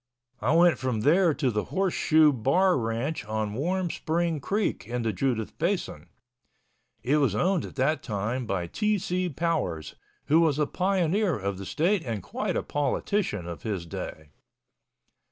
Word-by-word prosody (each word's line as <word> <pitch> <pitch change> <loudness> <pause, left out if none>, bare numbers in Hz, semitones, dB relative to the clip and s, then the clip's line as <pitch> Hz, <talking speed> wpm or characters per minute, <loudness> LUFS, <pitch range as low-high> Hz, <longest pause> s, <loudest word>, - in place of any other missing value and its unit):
I 160 - +2
went 170 0 +5
from 125 -4 -1
there 170 - +4
to 135 -5 0
the 105 -1 -1
Horse 190 -1 0
Shoe 155 -1 +4
Bar 175 - +3
Ranch 120 +5 -2
on 110 -1 -2
Warm 175 - -1
Spring 165 -1 -1
Creek 195 - -1
in 120 0 -2
the 110 -2 0
Judith 115 0 -1
Basin. 180 +3 -2 0.9
It 135 +5 +2
was 135 -9 +2
owned 180 - +1
at - - -10
that 140 +3 +1
time 110 +4 -3
by 95 -4 -1
T. 210 - 0
C. 180 -1 -1
Powers, 155 - -2 0.3
who 160 +3 +4
was 155 -4 +2
a 150 - +2
pioneer 185 +2 +1
of 100 -1 -3
the 95 - -6
state 175 +3 +1
and 110 -6 -4
quite - - -3
a - - -1
politician 145 - -1
of 85 -1 -7
his 100 -6 -3
day. 80 -1 -7
145 Hz, 165 wpm, -27 LUFS, 110-175 Hz, 0.9 s, went